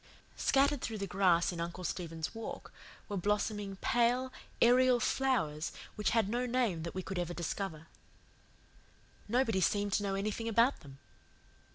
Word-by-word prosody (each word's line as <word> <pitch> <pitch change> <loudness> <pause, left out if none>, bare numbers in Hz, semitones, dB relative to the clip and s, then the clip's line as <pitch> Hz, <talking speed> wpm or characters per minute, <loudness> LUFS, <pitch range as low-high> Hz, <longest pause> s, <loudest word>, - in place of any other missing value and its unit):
Scattered 275 0 +3
through 225 - -3
the 200 - -3
grass 185 -2 +3
in 170 -1 -5
Uncle 170 +2 -5
Stephen's 165 -3 -4
Walk, 225 0 -7 0.3
were 205 - -3
blossoming 205 +1 -1
pale, 245 +4 +1 0.3
aerial 250 +1 +5
flowers 230 - 0 0.2
which 210 - 0
had 225 -3 +2
no 245 +4 -1
name 235 -9 0
that 170 +2 -6
we 185 - -3
could 190 0 -4
ever 175 0 -3
discover. 165 -2 -4 1.4
Nobody 225 -4 +2
seemed 205 +2 +1
to - - +2
know 195 -1 -1
anything 215 +3 -2
about 230 +4 +3
them. 140 -3 -13
205 Hz, 150 wpm, -33 LUFS, 175-240 Hz, 1.4 s, aerial